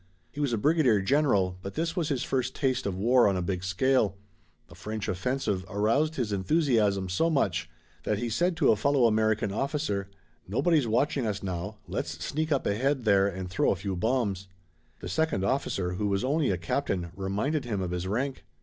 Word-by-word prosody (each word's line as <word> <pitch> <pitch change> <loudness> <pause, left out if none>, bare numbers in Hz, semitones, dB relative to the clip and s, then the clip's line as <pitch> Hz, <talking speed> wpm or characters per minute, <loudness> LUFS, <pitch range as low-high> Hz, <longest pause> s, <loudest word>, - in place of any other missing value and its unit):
He - - -9
was 145 -3 +1
a 115 - +1
brigadier 140 -4 +3
general, 100 -6 +2
but 100 +1 -7
this 165 +1 -1
was 165 -4 -1
his 135 -4 -1
first 130 -1 -1
taste 130 -4 0
of 95 -2 -3
war 120 +4 +4
on 95 - 0
a - - -1
big 90 0 -3
scale. 100 +2 +1 0.5
The 85 - -16
French 105 +5 -5
offensive 100 0 -1
aroused 115 +10 +1
his 115 -7 -2
enthusiasm 105 - +2
so 90 - +1
much 100 - 0 0.3
that 105 - -1
he 120 +3 -2
said 170 +9 0
to 155 - +4
a - - +4
fellow 135 +3 +2
American 110 -2 +2
officer: 110 -5 -2 0.4
"Nobody's 145 - +2
watching 125 +2 +1
us 105 -1 -3
now, 95 +3 -4
let's - - -4
sneak 155 +2 -2
up 140 - +1
ahead 130 +5 0
there 100 -2 +4
and 95 -1 -4
throw 90 +1 +1
a - - +2
few 95 -1 -4
bombs." 100 -2 -1 0.5
The - - -6
second 95 - 0
officer, 100 -6 -1
who 105 +3 -2
was 100 -1 0
only 145 +2 +1
a 95 - +1
captain, 90 -2 -2
reminded 105 - -1
him 105 -5 -2
of 90 -2 -3
his 90 +1 -3
rank. 130 +7 -2
110 Hz, 195 wpm, -28 LUFS, 95-135 Hz, 0.5 s, war